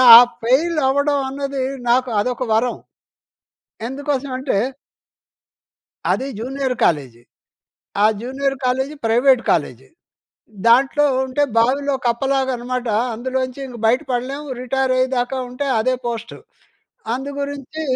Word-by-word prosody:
ఆ - - +13 0.2
ఫెయిలవ్వడం 285 +1 +2
అన్నది, 275 0 -3 0.3
నాకు 255 +1 +2
అదొక 250 +2 -2
వరం. 235 +3 +1 1.1
ఎందుకోసం 280 0 -3
అంటే... 260 -4 -1 1.6
అది 265 - -1
జూనియర్ 260 +2 -2
కాలేజీ. 130 -7 0 0.8
ఆ - - +7 0.2
జూనియర్ 270 +3 -2
కాలేజీ 265 +4 0
ప్రైవేట్ 245 +3 +4
కాలేజీ. 135 -6 0 0.8
దాంట్లో 270 +5 +5 0.2
ఉంటే 265 +3 0
బావిలో 275 +4 +2
కప్పలాగనమాట. 255 0 -1 0.3
అందులో 255 +3 -3
నుంచి 255 +2 -9
ఇంక 245 -2 -9
బయట 250 +5 +3
పడలేము. 270 +4 -3
రిటైరయ్యేదాకా 255 0 0
ఉంటే 250 +3 -3
అదే 255 +4 +1
పోస్టు. 230 -1 -5 0.8
అందు 265 +3 -4
గురించి 285 +2 -5
260 Hz, 105 wpm, -20 LUFS, 245-275 Hz, 1.6 s, ఆ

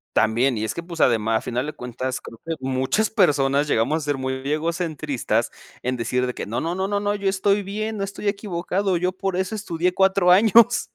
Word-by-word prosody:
También, 120 +4 +2
y 105 - -2
es 110 0 -2
que, 170 - -5
pues, 170 -2 -8
ademá 115 -2 +3
a 110 - +2
final 125 +3 -3
de 155 - -4
cuentas, 125 0 -5
creo 115 - -12
que 165 - -1
muchas 130 +11 0
personas 145 -8 +2
llegamos 145 +2 +1
a 155 - -6
ser 145 -1 0
muy 130 0 -3
egocentristas 155 -3 -1 0.3
en 125 +1 -1
decir 125 +1 -1
de 125 - -3
que - - -5
no, 115 - -2
no, 170 +2 -2
no, 190 0 -1
no, 200 0 -1
no, 205 0 0
yo 200 -1 -1
estoy 200 +1 +1
bien, 215 +3 -3
no 200 - -2
estoy 200 +1 -4
equivocado, 195 -1 -1
yo 180 +2 0
por 190 0 -3
eso 190 +3 -2
estudié 180 -3 -1
4 190 -1 +3
años, 225 +5 +5
170 Hz, 220 wpm, -23 LUFS, 130-195 Hz, 0.3 s, años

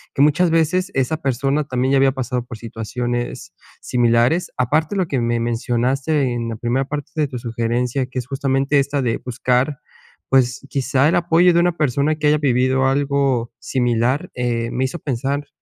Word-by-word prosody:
que - - +2
muchas 150 +4 +3
veces, 175 +4 +1
esa 135 +4 0
persona, 140 0 0
también 130 0 0
ya - - +5
había 135 0 +4
pasado 125 -2 -3
por 120 -2 -8
situaciones 120 +2 -4 0.3
similares. 120 +7 +2
Aparte, 150 - +1
lo 185 -3 0
que 135 - -1
me 120 0 0
mencionaste 125 +4 0
en 115 -1 -3
la 115 - -4
primera 120 +4 -1
parte 145 0 -5
de 155 -2 +1
tu 130 - -6
sugerencia, 120 +2 -1
que 130 - -9
es 125 - -7
justamente 135 +1 +1
esta 140 +1 0
de 115 -2 0
buscar, 125 +3 0 0.5
pues, 130 0 +2
quizá 135 +1 +1
el - - +2
apoyo 175 +1 +4
de 170 - +4
una 175 -1 +1
persona 145 +1 +1
que 150 -1 0
haya 150 +1 +4
vivido 130 -1 +2
algo 135 -3 0
similar. 125 +6 0
Eh, 120 -2 -1
me 130 - -1
hizo 135 +6 -4
pensar, 140 +2 -2
135 Hz, 175 wpm, -20 LUFS, 120-145 Hz, 0.5 s, ya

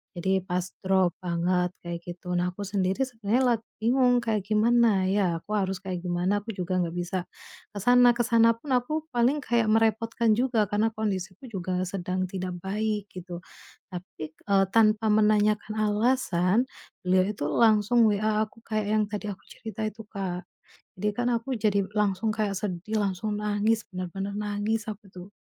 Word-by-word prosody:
Jadi 190 +1 0
pas 180 -1 -1 0.2
drop 185 -2 +2
banget 180 +1 +1
kayak 170 0 -4
gitu. 180 0 -5
Nah 180 +1 0
aku 200 +3 -7
sendiri 195 +2 0
sebenarnya 235 +1 0
lagi 225 0 -12
bingung 245 +2 +3
kayak 215 -4 0
gimana 215 -2 +3
ya? 190 -4 +1
Aku 210 - -13
harus 190 -2 -1
kayak 180 -2 -4
gimana, 180 +4 0
aku 225 - -5
juga 185 -2 -3
nggak 170 - -3
bisa 175 +1 -2 0.6
ke 205 - -5
sana 245 +3 +6
ke 240 - +2
sana 230 -1 +5
pun 290 - -11
aku 305 +6 -1
paling 245 +5 +2
kayak 235 -4 +1
merepotkan 225 +1 +2
juga 235 -3 +1
karena 215 +3 +1
kondisiku 195 +1 -3
juga 185 -4 -3
sedang 185 0 -2
tidak 185 -1 -4
baik 210 +1 -2
gitu. 175 -1 -7 0.5
Tapi, 160 -3 -8
k - - -36
eee, 195 0 +5
tanpa 220 0 +4
menanyakan 210 0 +3
alasan, 210 -3 +2 0.5
beliau 185 0 +3
itu 195 - -6
langsung 220 +5 +3
WA 215 +1 +1
aku 220 +1 -10
kayak 215 -2 -1
yang 215 - +3
tadi 210 0 -4
aku 185 - -11
cerita 220 -1 -8
itu, 220 +1 -8
Kak. 185 -2 -4 0.6
Jadi 210 - +2
kan 245 - +1
aku 230 +2 -3
jadi 200 -2 +2 0.2
langsung 210 +1 +1
kayak 210 -2 0
sedih, 200 +2 -3
langsung 200 +2 -2
nangis, 210 +2 +1
benar-benar 195 +2 -5
nangis 210 +1 -2
aku 210 -1 -9
tuh. 185 +2 -11
205 Hz, 165 wpm, -27 LUFS, 185-220 Hz, 0.6 s, sana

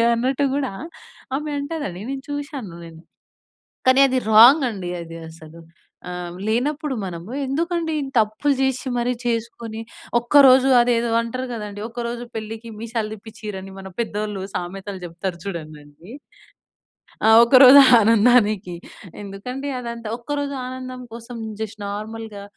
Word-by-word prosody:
అన్నట్టు 260 +4 0
గూడా, 270 -7 -2 0.6
ఆమె 300 +1 -4
అంటదండి, 285 - -5
నేను 270 -1 -5
చూషాను 280 - -6
నేను. 160 -1 -13 0.9
కానీ 260 +1 +6
అది 260 0 0
రాంగండి 230 - +6
అది, 165 0 -9
అసలు. 160 0 -13 0.5
ఆహ్, 175 -1 -6
లేనప్పుడు 280 +5 -1
మనము, 175 +4 -7
ఎందుకండి 330 +3 -1
ఇంతప్పులు 245 +2 +1
జేషి 265 0 0
మరీ 245 +1 0
చేసుకొని, 230 -1 -3 0.4
ఒక్కరోజు 265 +1 +6
అదేదో 235 -1 +1
అంటరు 255 +3 -4
గదండీ, 210 -2 -6
ఒక 235 0 -5
రోజు 240 0 -5
పెళ్ళికి 225 +1 -7
మీసాలు 225 -1 -3
తిప్పిచ్చురని, 200 -3 -9
మన 190 0 -9
పెద్దోళ్ళు 210 -3 -4
సామెతలు 190 +2 -5
చెప్తారు 170 +1 -5
చూడండండి. 155 0 -9 1.2
ఆ! - - +6 0.2
ఒక 235 - -2
రోజు 270 +2 +10 0.2
ఆనందానికి, 215 -4 +3 0.5
ఎందుకండి 250 +8 -6
అదంతా. 235 -2 -6
ఒక్కరోజు 285 +2 -3
ఆనందం 255 0 -7
కోసం, 235 +1 -9 0.2
జస్ట్ 220 0 -5
నార్మల్‍గా, 215 0 -6
230 Hz, 120 wpm, -22 LUFS, 200-260 Hz, 1.2 s, రోజు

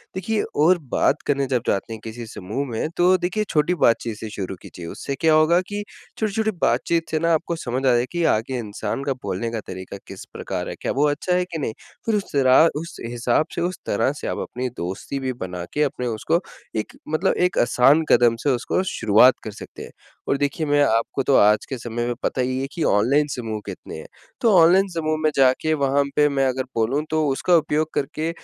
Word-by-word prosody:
देखिए, 210 +3 -1
और 170 +5 +4 0.2
बात 150 - +2
करने 140 -1 +1
जब 125 -3 0
जाते 100 +3 -1
हैं, 110 - -7
किसी 115 +1 -7
समूह 110 +7 -4
में, 115 +7 -2
तो 180 +1 +5
देखिए, 185 +4 -1
छोटी 160 +4 +2
बातचीत 115 -2 +1
से 110 - -6
शुरू 95 -2 -5
कीजिए, 85 - -10
उससे 140 - -5
क्या 160 -1 +4
होगा 155 +3 +5
कि 205 0 -3 0.3
छोटी-छोटी 220 0 0
बातचीत 165 -1 +1
से 155 - +1
ना, 165 +1 +2
आपको 165 +1 0
समझ 130 -3 -3
आ - - +5
जाएगा 120 0 +3
कि 175 -1 -1
आगे 125 +4 -3
इंसान 105 +3 -4
का 140 - 0
बोलने 115 -1 -3
का 115 - -3
तरीका 95 +1 -7
किस 95 - -9
प्रकार - - -4
है, - - -5
क्या - - -1
वो 145 +3 +2
अच्छा 165 +5 -1
है 180 - +1
कि 175 -2 -6
नहीं? 115 -6 -2 0.3
फिर 225 - +1
उस 205 - -3
तरह 135 +3 +5
उस 165 +2 -8
हिसाब 120 +4 0
से, 170 - -2
उस 180 +1 -1
तरह 130 +6 +1
से - - -5
आप - - -2
अपनी 125 +1 -4
दोस्ती 95 +10 -4
भी 130 -1 -2
बना 90 -6 -6
के 150 - 0
अपने 135 -3 -2
उसको 120 +9 0 0.4
एक 110 - -5 0.2
मतलब 160 +5 +1
एक - - -8
आसान 135 +6 +4
कदम 120 -1 +5
से 145 - +2
उसको 125 +7 0
शुरुआत 110 +4 +5
कर 110 - -5
सकते 105 - -10
हैं। - - -11 0.4
और 140 - +2
देखिए, 145 +3 -1
मैं 145 0 +3
आपको 115 +1 +1
तो 135 - +3
आज 105 +1 +4
के 135 - -3
समय 120 0 -4
में 120 - 0
पता 130 - 0
ही 130 +1 -1
है 135 - -2
कि 165 - -2
ऑनलाइन 130 +9 +3
समूह 110 -3 -4
कितने - - -8
हैं, 80 - -9 0.4
तो 230 - +4
ऑनलाइन 180 +4 +6
समूह 155 -1 0
में 155 - +4
जाके, 135 +4 +3
वहाँ 140 -1 +2
पे 150 0 +5
मैं 135 -1 +1
अगर 130 0 -1
बोलूँ, 115 +6 +1
तो 155 -1 +1
उसका 140 +6 +2
उपयोग 155 0 0
करके 155 +3 -2
135 Hz, 220 wpm, -22 LUFS, 115-160 Hz, 0.4 s, ऑनलाइन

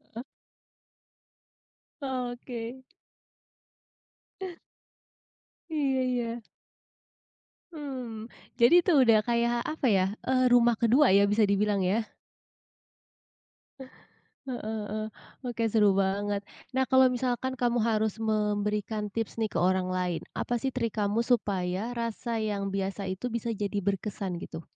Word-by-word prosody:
Heeh? 235 - -5 1.8
Oke. 250 -1 -5 2.9
Iya 275 -4 +1
iya. 240 -2 -2 1.3
Hmm, 250 -7 -6 0.3
jadi 235 +8 +7
itu - - +3
udah 230 -3 +6
kayak, 235 0 +1
apa 310 -3 -3
ya, 190 -3 +4 0.2
eee, 255 0 +3
rumah 240 -1 +5
ke-2 250 +5 +5
ya, 200 - +5
bisa 215 +1 +4
dibilang 200 0 +2
ya. 205 +5 +1 2.4
Heeh 250 -2 -4 0.3
heeh, 215 +1 -3 0.4
oke 230 -1 -1
seru 210 -2 +5
banget. 200 +1 0 0.2
Nah, 260 0 +1
kalau 260 0 +5
misalkan 250 +1 -1
kamu 240 -1 +1
harus 220 0 0
memberikan 210 0 -1
tips, 225 +1 -4
nih, 220 - +1
ke - - -4
orang 185 +1 +2
lain, 180 -2 -1 0.2
apa, - - -2
sih, 270 - 0
trik 235 -4 -2
kamu 210 +3 +1
supaya 200 -3 0
rasa 230 0 -2
yang 205 -2 -2
biasa 195 0 -3
itu 190 +6 -4
bisa 235 0 -2
jadi 205 0 -2
berkesan, 195 -1 -2
gitu? 165 -1 -7
225 Hz, 115 wpm, -28 LUFS, 200-245 Hz, 2.9 s, jadi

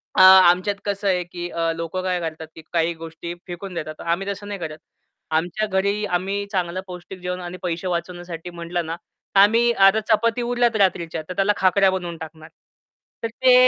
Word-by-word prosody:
अ, - - +5
आमच्यात 185 +1 +7
कसं 200 0 -2
आहे 180 -2 +2
की 175 0 -6
अ, 165 -1 0
लोक 165 +2 -5
काय 180 -1 0
करतात 160 -1 -5
की 160 - -10
काही 170 0 +2
गोष्टी 165 +1 -7
फेकून 180 +2 -7
देतात. 155 -2 -6
आम्ही 170 +4 -1
तसं 200 +1 -7
नाही 205 -1 -5
करत. 155 -2 -5 0.6
आमच्या 175 +6 0
घरी 200 +2 +1
आम्ही 195 +2 -1
चांगलं 185 -2 -1
पौष्टिक 180 +1 -9
जेवण 180 0 -4
आणि 175 +1 -6
पैसे 175 +1 -2
वाचवण्यासाठी 175 -1 -4
म्हटलं 170 0 -4
ना, 165 +1 -3
तर 195 - -4
आम्ही 230 +4 +5
आता 195 0 +5
चपाती 230 +2 +2
उरल्यात 240 -1 +1
रात्रीच्या 175 -5 +1
तर - - -3
त्याला 195 +2 +3
खाकऱ्या 190 +1 +4
बनवून 175 -3 -4
टाकणार. 160 0 -10 0.7
तर - - +1
ते 250 +3 +3
180 Hz, 185 wpm, -22 LUFS, 170-200 Hz, 0.7 s, आमच्यात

